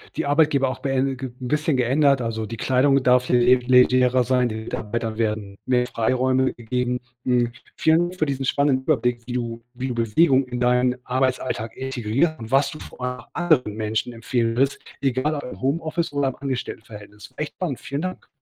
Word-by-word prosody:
die -, -, -2 dB
Arbeitgeber 145 Hz, -2 st, +3 dB
auch 130 Hz, -, -4 dB
bee 135 Hz, 0 st, 0 dB
ge 130 Hz, +1 st, -6 dB
'n 125 Hz, -, -4 dB
bisschen 150 Hz, +2 st, +1 dB
geändert. 135 Hz, +2 st, +3 dB
Also 110 Hz, -1 st, -3 dB
die 115 Hz, +2 st, -7 dB
Kleidung 135 Hz, +4 st, +3 dB
darf 125 Hz, 0 st, +3 dB
le 125 Hz, -, +4 dB
le 125 Hz, +1 st, +6 dB
legerer 125 Hz, 0 st, +5 dB
sein, 125 Hz, 0 st, +2 dB
den 110 Hz, 0 st, -5 dB
Mitarbeitern 110 Hz, 0 st, -4 dB
werden 105 Hz, -3 st, -2 dB
mehr 125 Hz, -1 st, +2 dB
Freiräume 130 Hz, +3 st, +1 dB
gegeben. 125 Hz, +1 st, -2 dB, 0.3 s
Hm, 120 Hz, -2 st, +2 dB, 0.2 s
vielen 160 Hz, +1 st, +3 dB
Dank 180 Hz, -, -10 dB
für 155 Hz, -, +3 dB
diesen 135 Hz, -1 st, -2 dB
spannenden 135 Hz, -1 st, +2 dB
Überblick, 125 Hz, -4 st, +1 dB
wie 120 Hz, -, -6 dB
du 115 Hz, -2 st, -4 dB
wie 130 Hz, +1 st, -4 dB
du 125 Hz, -, -3 dB
Bewegung 130 Hz, +4 st, +3 dB
in 125 Hz, -1 st, -4 dB
deinen 125 Hz, 0 st, +2 dB
Arbeitsalltag 130 Hz, -3 st, -1 dB
integriert 135 Hz, +4 st, -1 dB
und 110 Hz, 0 st, -9 dB
was 135 Hz, +1 st, +3 dB
du 155 Hz, -, -9 dB
vor -, -, -12 dB
allem 125 Hz, 0 st, -3 dB
auch -, -, -21 dB
anderen 155 Hz, -11 st, +2 dB
Menschen 110 Hz, +2 st, -2 dB
empfehlen 115 Hz, 0 st, -1 dB
würdest, 135 Hz, +2 st, +1 dB, 0.2 s
egal 135 Hz, +2 st, 0 dB
ob 145 Hz, -, -5 dB
im 100 Hz, -6 st, -9 dB
Homeoffice 160 Hz, +4 st, -1 dB
oder 145 Hz, -1 st, +1 dB
im 130 Hz, -, -2 dB
Angestelltenverhältnis. 110 Hz, -5 st, -7 dB
Echt 150 Hz, -1 st, -4 dB
spannend, 160 Hz, -9 st, -3 dB
vielen 140 Hz, +2 st, -4 dB
Dank. 185 Hz, 0 st, -5 dB
125 Hz, 190 wpm, -23 LUFS, 120-135 Hz, 0.3 s, le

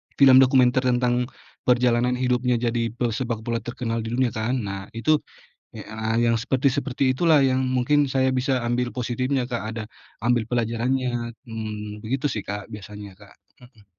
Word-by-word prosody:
film 135 Hz, -2 st, +7 dB
dokumenter 130 Hz, -1 st, +5 dB
tentang 125 Hz, 0 st, +1 dB, 0.4 s
perjalanan 125 Hz, 0 st, +3 dB
hidupnya 125 Hz, 0 st, +1 dB
jadi 115 Hz, 0 st, 0 dB
pesepak 115 Hz, -1 st, -2 dB
bola 115 Hz, 0 st, -1 dB
terkenal 115 Hz, 0 st, -4 dB
di 115 Hz, -, -4 dB
dunia, 130 Hz, -2 st, +1 dB
kan. 110 Hz, +4 st, -1 dB
Nah, 100 Hz, -1 st, -5 dB
itu 150 Hz, +7 st, +2 dB, 0.6 s
e -, -, -7 dB
a 110 Hz, +2 st, -2 dB
yang 115 Hz, -1 st, +3 dB
seperti-seperti 130 Hz, +1 st, 0 dB
itulah 160 Hz, -1 st, +4 dB
yang 130 Hz, -1 st, +2 dB
mungkin 130 Hz, +3 st, +2 dB
saya 130 Hz, 0 st, +1 dB
bisa 130 Hz, 0 st, +1 dB
ambil 120 Hz, 0 st, -1 dB
positifnya, 125 Hz, +1 st, -1 dB
Kak, 120 Hz, -4 st, -3 dB
ada 115 Hz, -, -4 dB, 0.4 s
ambil 120 Hz, -1 st, +1 dB
pelajarannya. 120 Hz, +1 st, -1 dB, 0.2 s
Mmm, 105 Hz, -1 st, -6 dB
begitu 135 Hz, +5 st, -1 dB
sih, 105 Hz, -7 st, -4 dB
Kak, 105 Hz, 0 st, -5 dB
biasanya, 105 Hz, -2 st, -10 dB
Kak. 100 Hz, 0 st, -17 dB, 0.4 s
Mhm. 110 Hz, -5 st, -23 dB
120 Hz, 155 wpm, -24 LUFS, 115-130 Hz, 0.6 s, film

